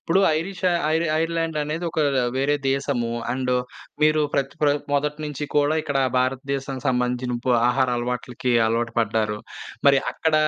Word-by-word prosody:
ఇప్పుడు 185 +4 +2 0.2
ఐరిష 180 +3 -6 0.3
ఐర్ 165 +1 +2 0.2
ఐర్లాండ్ 165 -1 -1
అనేది 155 +4 -3
ఒక 155 - -1 0.4
వేరే 145 +2 +2
దేశము. 135 -4 -1 0.2
అండ్ 130 -1 -1 0.5
మీరు 155 0 +4
ప్రత్ 135 0 0
ప్ర 150 - +4 0.2
మొదటి 150 +1 0
నుంచి 150 0 -4
కూడా, 145 +1 +3
ఇక్కడ 140 -1 -1 0.2
భారతదేశానికి 135 +1 -2
సంబంధించిన 125 0 0
పు 125 - +4 0.2
ఆహార 130 +1 +2
అలవాట్లకి 125 +1 -2
అలవాటు 115 +1 -1
పడ్డారు. 110 -1 0 0.5
మరి 140 -1 +5
అక్కడ 160 -1 0
135 Hz, 145 wpm, -23 LUFS, 125-150 Hz, 0.5 s, మరి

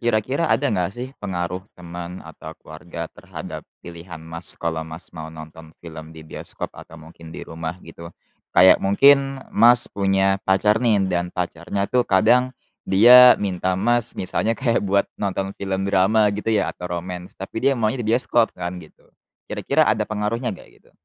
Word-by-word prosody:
Kira-kira 120 +7 0
ada 145 - +1
enggak 90 0 -2
sih 125 +1 -5
pengaruh 90 -2 -3 0.2
teman 85 0 -8
atau 80 0 -11
keluarga - - -8
terhadap - - -9 0.2
pilihan, 85 0 -9
Mas, 80 +1 -8
kalau, 80 -1 -3
Mas, 80 +2 -10
mau 80 -2 -8
nonton 80 0 -12
film 80 -2 -10
di 80 - -11
bioskop 80 - -7
atau 85 - -13
mungkin 80 +1 -14
di 80 - -8
rumah 80 +1 -6
gitu? 85 0 -11 0.5
Kayak 95 +1 +7
mungkin, 135 +6 +3
Mas, 120 +2 +5
punya 95 0 +1
pacar 105 +3 +2
nih 110 -5 +2
dan 90 -2 -1
pacarnya 90 +2 -3
tuh 125 +4 0
kadang 115 +6 +4 0.4
dia 125 +6 +8
minta, 95 -2 -2
Mas, 120 +4 0
misalnya 110 +5 -1
kayak 120 -3 +1
buat 100 0 +1 0.2
nonton 95 -1 -2
film 95 -1 -2
drama 100 +2 +3
gitu 105 +2 -4
ya 110 -2 +1
atau 90 - -8
romance 90 +1 -7
tapi 95 +4 -6
dia 135 0 +2
maunya 115 +2 -1
di 110 - -3
bioskop 120 0 +1
kan 90 +1 -5
gitu. 80 - -18 0.5
Kira-kira - - +1
ada - - 0
pengaruhnya 110 +4 -2
nggak - - -16
gitu? - - -27
95 Hz, 165 wpm, -22 LUFS, 85-110 Hz, 0.5 s, dia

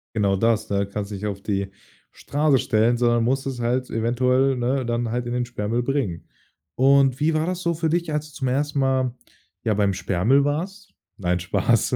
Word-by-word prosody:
Genau 100 -2 +2
das, 115 +1 +1
ne? 100 0 0
Kannst 100 +1 -5
nicht 100 0 -5
auf 100 -2 -4
die 100 -1 -2 0.4
Straße 145 -1 +1
stellen, 120 -2 +2
sondern 120 -1 +2
musst 135 +3 0
es 135 -2 -4
halt 125 +2 -1
eventuell, 125 +4 +2
ne, 130 +2 0
dann 120 0 -1
halt 120 0 -2
in 120 - -3
den 125 0 0
Sperrmüll 120 0 -2
bringen. 120 - -2 0.5
Und, 135 0 +4
wie 155 +2 +2
war 155 0 +1
das 180 0 -3
so 170 -1 0
für 160 0 -1
dich, 170 0 -1
als 150 0 -2
du - - -19
zum 130 - -2
1. 145 +3 0
Mal, 130 -2 +1 0.5
ja, 110 - +1
beim 100 -1 +2
Sperrmüll 95 +9 +2
warst? 185 +7 -4 0.2
Nein, 90 -2 0
Spaß. 90 - +1
125 Hz, 195 wpm, -23 LUFS, 105-140 Hz, 0.5 s, Und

